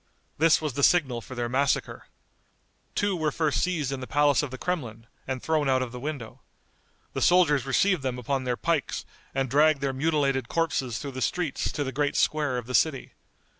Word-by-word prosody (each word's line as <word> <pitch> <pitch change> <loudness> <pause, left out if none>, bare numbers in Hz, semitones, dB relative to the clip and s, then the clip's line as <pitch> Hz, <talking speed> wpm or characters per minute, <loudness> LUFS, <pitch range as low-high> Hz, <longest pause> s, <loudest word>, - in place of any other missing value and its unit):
This 165 +1 +5
was 150 -4 -2
the 140 - -2
signal 135 -7 +3
for 130 - -10
their 120 -1 -2
massacre. 135 +3 -1 0.9
Two 205 -1 +1
were 155 -3 0
first 155 -1 0
seized 160 -7 -1
in 135 - -3
the 130 - -7
palace 145 -1 +3
of 145 - -4
the 130 - -7
Kremlin, 120 -10 -4 0.2
and 130 -1 -4
thrown 155 -3 +1
out 130 -1 +2
of 125 - -6
the 125 - -7
window. 135 -4 -6 0.7
The - - -3
soldiers 150 -7 +4
received 185 +6 +2
them 130 -2 -2
upon 130 +2 -2
their 125 -1 -1
pikes, 165 -5 -1 0.3
and 135 0 0
dragged 150 +3 +4
their 135 -1 -1
mutilated 135 -3 0
corpses 135 -8 -1
through 140 - -5
the 130 0 -6
streets 175 -2 -1
to 145 - -1
the 135 - -4
great 145 +2 -1
square 150 -4 +1
of 120 - -4
the 125 - -7
city. 140 -1 +1
140 Hz, 200 wpm, -26 LUFS, 130-155 Hz, 0.9 s, This